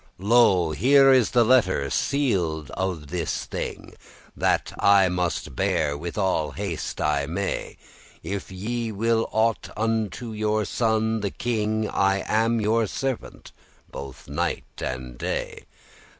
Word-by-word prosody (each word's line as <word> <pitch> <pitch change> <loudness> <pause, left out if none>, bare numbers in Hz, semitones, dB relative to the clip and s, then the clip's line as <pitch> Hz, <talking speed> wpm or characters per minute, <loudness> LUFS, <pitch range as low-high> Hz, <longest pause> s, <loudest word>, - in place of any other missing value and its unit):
"Lo, 100 -5 +4
here 135 - +5
the 120 +2 +3
letter 100 - +3
sealed 90 - 0
of 90 -6 -3
this 85 -2 -2
thing, - - -6 0.4
That - - 0
I 100 -2 +5
must 90 -7 -2
bear 70 +3 +1
with 85 +6 -6
all 95 -6 +1
the - - -14
haste 100 -5 -4
I 70 -2 +1
may: 95 +5 -3 0.5
If 100 -1 -5
ye 115 +5 -3
will 115 +2 0
aught 110 0 +1
unto 110 +1 -1
your 105 0 0
son 110 +1 0
the 100 -1 -2
king, 110 -1 -1
I 95 -1 +1
am 115 +1 +2
your 110 +1 +2
servant 135 +3 -4 0.4
both 70 -2 -9
by 70 - -10
night 85 +3 -1 0.2
and 65 -1 -5
day." - - -4
100 Hz, 135 wpm, -24 LUFS, 85-115 Hz, 0.5 s, here